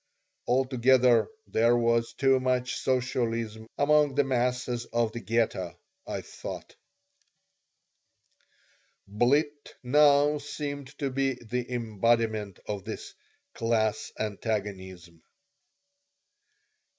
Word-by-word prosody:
Altogether 125 -2 +4 0.2
there 115 +2 +3
was 115 0 +1
too 135 -1 +3
much 125 -1 0
socialism 115 -4 -1
among 150 -1 +3
the 145 - +4
masses 125 -2 -1
of 115 -2 0
the 120 - -6
Ghetto, 105 -5 -1 0.3
I - - -3
thought - - -9 2.3
Blitt 145 +8 0
now 145 +2 +4
seemed 145 -1 -5
to 140 -2 -2
be 135 0 0
the 125 +1 -5
embodiment 110 -3 0
of 100 -2 -4
this - - -7 0.4
"class 110 -2 0
antagonism." 95 -5 -4
120 Hz, 90 wpm, -28 LUFS, 110-130 Hz, 2.3 s, Altogether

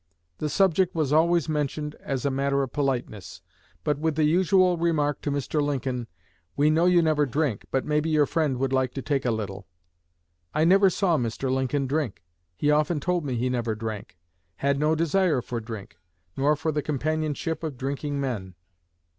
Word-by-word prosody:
The 150 - -1
subject 185 +2 +2
was 150 -3 0
always 170 +1 +3
mentioned 150 0 -2
as 135 -2 -3
a 140 - +2
matter 140 +1 +1
of 130 - -6
politeness, 110 - -3 0.4
but 150 -1 0
with 160 -1 0
the 155 - +2
usual 180 +3 +4
remark 160 -4 0
to - - -2
Mr. 145 +2 -1
Lincoln, 130 -4 -2 0.5
'We 150 +2 +4
know 165 +3 +3
you 175 -1 +5
never 150 -2 +2
drink, 135 -4 -1
but 135 - -1
maybe 150 +1 0
your 155 -2 +4
friend 150 -3 0
would 135 +1 -1
like 130 -1 0
to 135 - -4
take 140 -3 -1
a - - +2
little.' 100 -4 -4 0.9
I 155 - +3
never 195 +3 +6
saw 175 -4 +1
Mr. 120 +2 -2
Lincoln 130 +1 0
drink. 130 - -2 0.3
He 150 - +2
often 150 +1 +2
told 175 +3 0
me 135 -4 -2
he 120 +2 0
never 120 -3 -1
drank; 105 -5 -6 0.4
had 140 +5 0
no 155 +2 +2
desire 165 -1 +2
for 120 -1 -4
drink, 110 -6 -8 0.4
nor 145 +3 +2
for 160 +2 -2
the 150 0 -1
companionship 155 +2 -2
of 150 -5 -4
drinking 140 +2 -3
men." 105 -9 -3
145 Hz, 180 wpm, -26 LUFS, 130-155 Hz, 0.9 s, never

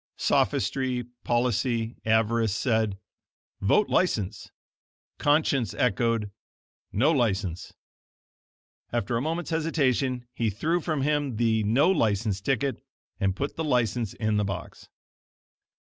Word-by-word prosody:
Sophistry, 125 +4 +1 0.2
policy, 120 -1 0
avarice 110 -1 +2
said: 110 -5 0 0.6
"Vote 155 - +3
License." 105 - 0 0.7
Conscience 145 - +2
echoed: 115 -2 +1 0.6
"No 135 +10 +3
License." 100 - -1 1.2
After 120 -1 -1
a 115 - 0
moment's 165 +4 -3
hesitation, 135 -6 0
he 115 -2 0
threw 160 - 0
from 155 -4 -1
him 145 -3 0
the 110 -1 +2
No 135 - +4
License 105 - +1
ticket 135 +3 -1 0.4
and 95 -2 +1
put 140 +7 -4
the 160 - -1
License 120 -6 0
in 110 -1 0
the 105 - +2
box. 95 -2 -6
120 Hz, 110 wpm, -27 LUFS, 105-140 Hz, 1.2 s, No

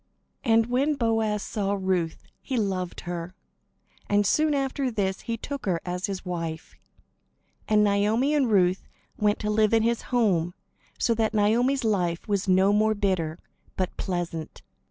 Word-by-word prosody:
And 225 -2 +4
when 265 +5 +1
Boaz 225 -4 0
saw 200 -2 -2
Ruth, 180 -4 -1 0.2
he 260 - -3
loved 190 -4 -2
her; 175 +1 -5 0.7
and 205 0 +3
soon 305 +8 +2
after 270 -1 -1
this 200 -4 -2
he 230 -1 -3
took 280 0 -6
her 175 -3 +1
as 180 +1 -2
his 195 -1 -5
wife. 165 -3 -5 0.9
And 210 -1 +4
Naomi 210 +7 +2
and 280 -5 +2
Ruth 185 -3 +2 0.3
went 210 0 +2
to 210 - -1
live 215 +1 +3
in 225 - +3
his 235 0 +1
home; 185 -9 +1 0.4
so 235 - +2
that 220 -1 0
Naomi's 240 +6 +2
life 180 -6 0
was 200 -2 0
no 190 +2 +4
more 215 +1 +3
bitter, 185 -6 -1 0.4
but 185 -1 -2
pleasant. 175 -4 -4
205 Hz, 155 wpm, -26 LUFS, 185-230 Hz, 0.9 s, And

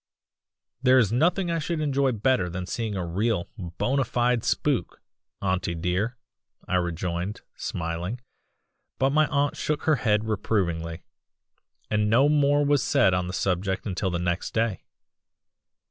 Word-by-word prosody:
"'There 130 0 +5
is 110 -5 +4
nothing 175 +8 +2
I 165 - 0
should 165 +1 -2
enjoy 140 -3 +1
better 115 -4 +1
than 90 +1 -4
seeing 110 +2 -3
a 90 -2 -2
real 95 +2 0 0.3
bona 135 +1 +1
fide 120 -1 +1
spook, - - 0 0.4
auntie 95 -2 0
dear,' 90 +8 -1 0.5
I 90 - +1
rejoined, 90 +2 -2
smiling; 85 +7 -4 0.8
but 135 +1 +2
my 155 +1 +4
aunt 145 -1 0
shook 150 -1 -2
her 155 -2 +3
head 110 -2 +1
reprovingly, 85 -6 -1 0.9
and 105 0 +2
no 130 +6 +5
more 145 -1 +3
was 145 -1 +3
said 120 -10 +3
on 90 0 0
the - - -4
subject 95 +1 -1
until 95 -1 -1
the 85 - -1
next 85 +1 -2
day. 110 -3 0
110 Hz, 145 wpm, -26 LUFS, 90-135 Hz, 0.9 s, There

